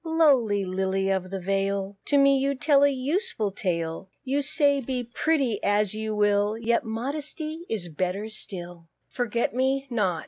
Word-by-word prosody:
Lowly 270 - +3
Lily 190 +1 0
of 185 -1 -1
the 195 0 -4
Vale, 195 +1 -1
To 285 - +2
me 275 -1 +5
you 275 +1 0
tell 280 +2 +4
a 285 - +6
useful 275 - -1
tale: 170 -1 -3
You 275 +2 0
say, 285 0 +2
"Be 255 0 -3
pretty 255 -2 0
as 205 0 +2
you 215 0 -3
will, 205 +1 +2
Yet 235 +1 +1
modesty 300 +7 -4
is 205 -6 -2
lovelier 185 +6 -2
still." 175 -5 -9 0.2
FORGET 235 -2 -1
ME 265 +2 +1
NOT. 190 -8 +1
220 Hz, 160 wpm, -26 LUFS, 195-275 Hz, 0.2 s, a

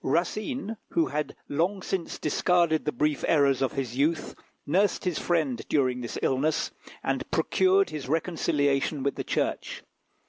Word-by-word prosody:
Racine, 215 - -1 0.2
who 335 -1 +3
had 150 0 -3
long 180 +6 0
since 185 -3 -3
discarded 170 0 +2
the 150 - +1
brief 150 -1 0
errors 140 -4 +3
of 135 - +1
his 130 -4 -3
youth, 150 +4 0 0.3
nursed 190 +7 +2
his 180 -3 0
friend 155 -9 0
during 130 -4 +1
this 120 - -5
illness, 150 +4 +1 0.3
and - - -1
procured 385 +1 +3
his 140 -4 -5
reconciliation 150 -3 +1
with 140 - +1
the - - -4
Church. - - -2
155 Hz, 145 wpm, -27 LUFS, 140-180 Hz, 0.3 s, who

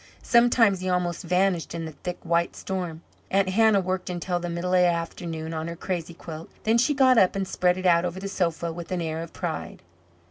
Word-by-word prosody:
Sometimes 235 -5 +4
he 185 0 -3
almost 180 -1 0
vanished 180 -1 0
in 165 -1 -4
the 160 - -6
thick 175 +4 -6
white 170 0 +1
storm. 175 -4 -4 0.3
Aunt 195 -1 +2
Hannah 220 +1 +4
worked 185 0 -3
until 175 0 -2
the 175 0 -4
middle 170 +2 -2
of 185 - +5
the 180 - +5
afternoon 165 -1 -3
on 160 0 -3
her 170 - -5
crazy 170 -1 -4
quilt. 160 -1 -9
Then 225 +2 +3
she 290 +4 +2
got 260 -3 +5
up 185 - +4
and 195 -1 -1
spread 180 0 +1
it 185 - -5
out 170 -1 +5
over 180 +1 -3
the 195 - -5
sofa 170 -3 -1
with 170 +2 -8
an 185 - -1
air 160 -1 -3
of 165 - -8
pride. 165 -3 -5
180 Hz, 220 wpm, -25 LUFS, 170-190 Hz, 0.3 s, of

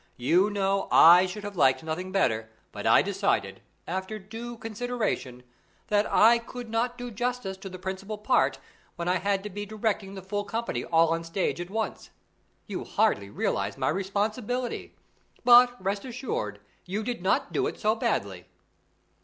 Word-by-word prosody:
You 175 +11 +3
know, 195 -1 0
I 175 +3 +8
should 205 +3 -7
have 205 -1 -6
liked 135 -2 +3
nothing 170 +4 -4
better, 110 - +1 0.2
but - - -4
I - - +6
decided, - - -1 0.3
after 190 +4 -3
due 225 +4 -8
consideration, 225 - -3 0.5
that 210 0 +2
I 230 +2 +6
could 235 0 -9
not 240 +2 0
do 245 -1 -6
justice 240 -3 -2
to 195 0 -8
the 185 - -8
principal 190 +3 -5
part, 250 +5 +2 0.4
when 170 0 -4
I 180 +1 +2
had 195 +1 0
to 210 - -5
be 205 +2 -5
directing 205 -2 -2
the 190 - -8
full 205 +2 -2
company, 230 +3 -3
all 165 -1 +4
on 165 0 -1
stage 175 +1 -2
at 175 - -6
once. 220 +1 -3 0.6
You - - -5
hardly 100 0 +1
realize 100 0 -2
my 130 -1 0
responsibility. 210 +6 -2 0.5
But, 245 0 +7
rest 200 +2 -2
assured, 230 - -4 0.3
you 205 +4 -2
did 240 -3 -4
not 190 - 0
do - - +1
it - - -6
so 215 +1 +2
badly." 100 - -2
200 Hz, 165 wpm, -27 LUFS, 180-225 Hz, 0.6 s, I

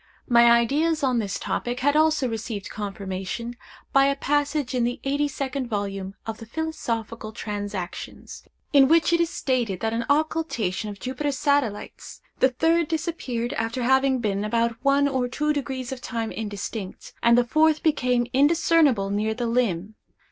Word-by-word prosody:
My 235 -1 +6
ideas 290 +7 +2
on 255 -3 +2
this 200 -4 -2
topic 245 +1 -3
had 285 +2 +2
also 310 -3 +3
received 220 -3 -5
confirmation 200 +3 -5 0.4
by 275 0 +6
a 280 0 +2
passage 290 -1 0
in 250 -2 +1
the 240 +1 -1
eighty 285 +2 +1
second 275 -2 -3
volume 195 -3 -3
of 225 -1 -5
the 225 - -10
Philosophical 230 -7 -4
Transactions, 205 -4 -6 0.3
in 275 -2 +7
which 330 +2 +4
it 340 - +4
is 335 - +1
stated 240 - -1
that 225 0 0
at 230 - -1
an - - -7
occultation 285 - 0
of 200 -1 -8
Jupiter's 270 +4 -3
satellites, 280 -8 -1 0.2
the 260 - +5
third 325 +5 +2
disappeared 295 -8 -3
after 230 +3 -2
having 265 +1 +3
been 205 -4 -1
about 230 +2 -1
1″ 280 0 +4
or 260 -3 0
2″ 275 -2 -2
of 260 -2 -6
time 230 -3 -3
indistinct, 205 -2 -6
and 235 0 +5
the 245 - +5
fourth 310 +4 +3
became 250 -6 +2
indiscernible 290 -7 +3
near 215 +2 0
the 240 +1 -2
limb. 220 -5 0
245 Hz, 160 wpm, -24 LUFS, 220-285 Hz, 0.4 s, in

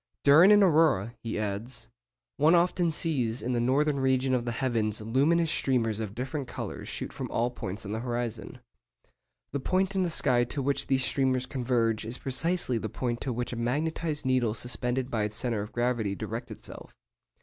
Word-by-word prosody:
'During 160 +8 +7
an 205 -1 +7
aurora,' 150 - +3
he 115 -1 -4
adds, 110 +3 -4 0.5
'one 155 +4 +5
often 175 0 +2
sees 130 -8 -1
in 125 - -1
the 120 - +1
northern 140 +4 +2
region 130 0 +2
of 125 -2 0
the 120 - -1
heavens 115 -4 -1
luminous 145 +9 +2
streamers 115 -5 +1
of 105 -2 -5
different 135 +2 -4
colours - - -6
shoot - - -4
from - - -5
all 120 +1 0
points 100 -3 -6
of 100 - -5
the 110 - -2
horizon. 120 0 -4 0.9
The 140 - -2
point 185 +6 0
in 190 - +1
the 180 - +1
sky 125 -6 +3
to 130 +4 -4
which 140 +1 0
these 130 -1 +3
streamers 130 -1 +1
converge 120 -4 0
is 115 +3 -3
precisely 135 -2 -1
the 110 - -4
point 120 +2 -3
to 130 - -2
which 120 +1 -3
a - - -3
magnetised 150 +6 -2
needle 125 -4 +1
suspended 125 +2 -2
by 110 - 0
its 105 0 -2
centre 115 -3 -1
of 105 - -7
gravity 120 -4 0
directs - - -5
itself.... - - -10
125 Hz, 185 wpm, -28 LUFS, 115-140 Hz, 0.9 s, During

